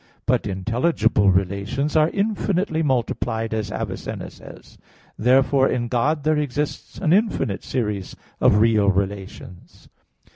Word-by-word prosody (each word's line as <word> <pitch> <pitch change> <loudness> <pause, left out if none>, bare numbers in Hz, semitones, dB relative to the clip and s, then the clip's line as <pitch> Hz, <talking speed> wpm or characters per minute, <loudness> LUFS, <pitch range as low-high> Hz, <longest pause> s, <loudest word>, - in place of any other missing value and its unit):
But - - +1
intelligible 110 - +1
relations 100 +10 0
are 155 0 +4
infinitely 195 -5 -1
multiplied, 120 -5 -1
as 110 -2 -3
Avicenna - - -5
says. - - -14 0.4
Therefore 130 +2 +3
in 120 -1 -1
God 140 +5 0
there 155 0 +2
exists 145 0 -3
an 165 -4 +1
infinite 200 - 0
series 105 -7 -3 0.2
of 100 - +4
real 105 -2 +4
relations. 95 -2 -5
120 Hz, 115 wpm, -22 LUFS, 100-150 Hz, 0.4 s, are